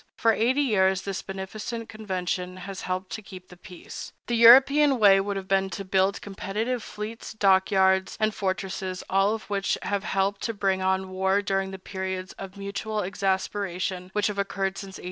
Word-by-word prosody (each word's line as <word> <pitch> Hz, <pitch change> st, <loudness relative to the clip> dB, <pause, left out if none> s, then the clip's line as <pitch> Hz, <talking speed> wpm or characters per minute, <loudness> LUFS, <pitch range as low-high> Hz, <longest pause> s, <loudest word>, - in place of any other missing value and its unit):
For 225 Hz, -1 st, +4 dB
eighty 255 Hz, +7 st, +2 dB
years 190 Hz, -6 st, +2 dB
this 195 Hz, -1 st, -3 dB
beneficent 215 Hz, +4 st, -6 dB
convention 185 Hz, -4 st, -4 dB
has 190 Hz, +1 st, -7 dB
helped 185 Hz, +1 st, -3 dB
to 220 Hz, -, -5 dB
keep 185 Hz, -2 st, -12 dB
the 180 Hz, -, -12 dB
peace. 180 Hz, 0 st, -10 dB
The 240 Hz, -, -1 dB
European 270 Hz, +4 st, +7 dB
way 200 Hz, -3 st, +6 dB
would 200 Hz, 0 st, -2 dB
have 190 Hz, -1 st, -6 dB
been 195 Hz, 0 st, +2 dB
to 195 Hz, -, -6 dB
build 190 Hz, +1 st, +1 dB
competitive 210 Hz, +5 st, -3 dB
fleets, 215 Hz, +1 st, -7 dB
dock 190 Hz, -3 st, +3 dB
yards, 190 Hz, 0 st, +2 dB
and 215 Hz, 0 st, +1 dB
fortresses, 190 Hz, -1 st, -3 dB
all 195 Hz, +3 st, +3 dB
of 220 Hz, -, -8 dB
which 200 Hz, -1 st, 0 dB
would -, -, -4 dB
have 200 Hz, -1 st, -1 dB
helped 195 Hz, +1 st, 0 dB
to 230 Hz, -, -2 dB
bring 195 Hz, -2 st, 0 dB
on 190 Hz, 0 st, 0 dB
war 190 Hz, +2 st, +1 dB
during 195 Hz, -1 st, 0 dB
the 190 Hz, -, -7 dB
periods 190 Hz, 0 st, -5 dB
of 195 Hz, 0 st, -8 dB
mutual 205 Hz, +2 st, -3 dB
exasperation 190 Hz, -1 st, -2 dB
which 210 Hz, -1 st, +1 dB
have 205 Hz, -1 st, -1 dB
occurred 195 Hz, -1 st, -1 dB
since 195 Hz, -2 st, -8 dB
1817. -, -, -12 dB
195 Hz, 185 wpm, -26 LUFS, 190-210 Hz, -, European